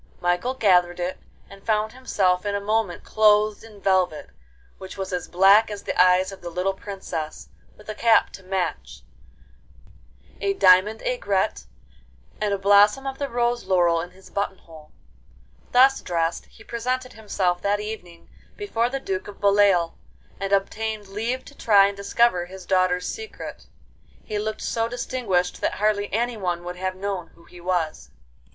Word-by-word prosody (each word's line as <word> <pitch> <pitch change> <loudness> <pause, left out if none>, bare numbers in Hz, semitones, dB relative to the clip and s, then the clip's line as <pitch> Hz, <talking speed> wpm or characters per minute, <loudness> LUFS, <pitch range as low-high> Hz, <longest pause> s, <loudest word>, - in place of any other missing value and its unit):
Michael 175 +9 0
gathered 180 -6 +3
it, 180 +1 -3 0.3
and 195 0 -15
found 215 -1 0
himself 190 -8 0
in 205 -1 -2
a - - 0
moment 210 -2 -1
clothed 210 0 +3
in 215 -2 -14
velvet, 185 - 0 0.5
which 190 +1 -9
was 190 -1 -4
as 180 -2 -3
black 195 +5 +5
as 205 -1 -7
the - - -3
eyes 185 +1 +4
of 195 - -11
the 175 - -6
little 180 +3 -1
Princess, 190 -6 -6 0.3
with 210 - -17
a 215 - -4
cap 225 +1 +3
to - - -11
match, 180 - -4 1.4
a 200 0 0
diamond 190 +4 +5
aigrette, 195 - -1 0.7
and 210 -1 0
a 200 - +1
blossom 205 +6 +4
of 270 0 -5
the 280 -1 -2
rose 240 -1 0
laurel 175 -3 +3
in 175 - -7
his 185 +1 -18
button 200 -1 -2
hole. 160 -3 -16 0.8
Thus 265 +2 +5
dressed, 165 -1 -2
he 220 - -17
presented 255 +2 -3
himself 190 -5 -1
that 205 +1 +1
evening 195 -6 -8 0.3
before 240 - -1
the 270 +1 -3
Duke 190 -7 -4
of 205 - -11
Beloeil, 200 -4 +3 0.4
and 195 0 -3
obtained 210 +1 -1
leave 230 +6 -3
to 285 - -14
try 205 -7 +5
and 200 0 -1
discover 200 -2 +1
his 190 0 -11
daughters' 185 -1 +1
secret. 440 0 -8 0.6
He 210 -1 -3
looked 215 +1 -4
so 230 -1 -1
distinguished 230 -7 -2
that - - 0
hardly 205 0 0
anyone 210 -6 -1
would 180 0 -6
have 185 0 -3
known 190 -2 -4
who 170 - -20
he 175 +1 -15
was. 170 - -2
200 Hz, 160 wpm, -24 LUFS, 180-220 Hz, 1.4 s, black